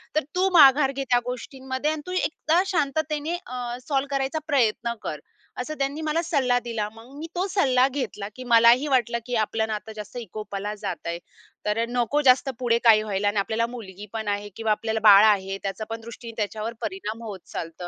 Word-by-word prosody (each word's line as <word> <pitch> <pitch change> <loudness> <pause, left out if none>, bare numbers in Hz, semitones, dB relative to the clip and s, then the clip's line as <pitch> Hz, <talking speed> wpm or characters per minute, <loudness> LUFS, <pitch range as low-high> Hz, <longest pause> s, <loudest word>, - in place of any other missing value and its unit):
तर 310 - +2
तू 370 +1 +3
माघार 275 -3 +7
घे 275 0 -3
त्या 245 - +5
गोष्टींमध्ये 260 +3 -3
आणि 310 -1 -4
तू 365 - -6
एकदा 340 -1 +1
शांततेने 305 -1 -1
अ, 245 -1 -5
सॉल्व्ह 280 -1 0
करायचा 275 +4 -1
प्रयत्न 235 -5 +1
कर." 150 - -4 0.4
असं 305 +5 -5
त्यांनी 280 +3 -1
मला 315 +2 0
सल्ला 275 -7 +2
दिला. 230 -3 -3
मग 225 +3 -14
मी 320 +2 -6
तो 360 +2 0
सल्ला 260 -9 +3
घेतला 250 -7 -4
की 255 - -8
मलाही 235 +5 +6
वाटलं 235 -3 +1
की 245 - -3
आपलं 220 +1 -1
नातं 220 0 -5
जास्त 210 +3 -8
विकोपाला 210 0 -5
जातयं, 170 -4 -4 0.5
तर 210 +1 0
अ, - - +1
नको 245 +4 +1
जास्त 265 +2 +4
पुढे 235 -2 +2
काही 220 -2 +6
व्हायला 205 -1 -1
आणि 205 0 0
आपल्याला 225 +3 0
मुलगी 205 -3 -9
पण 220 -2 -4
आहे 205 0 -2
किंवा 225 -1 -1
आपल्याला 220 +1 0
बाळ 200 +1 +9
आहे, 195 -2 +2
त्याचा 195 +2 -3
पण 225 0 -5
दृष्टीने 230 0 -9
त्याच्यावर 215 +2 -3
परिणाम 235 - -5
होत 205 -4 -6
चालतं 165 +2 -6
235 Hz, 190 wpm, -25 LUFS, 215-275 Hz, 0.5 s, बाळ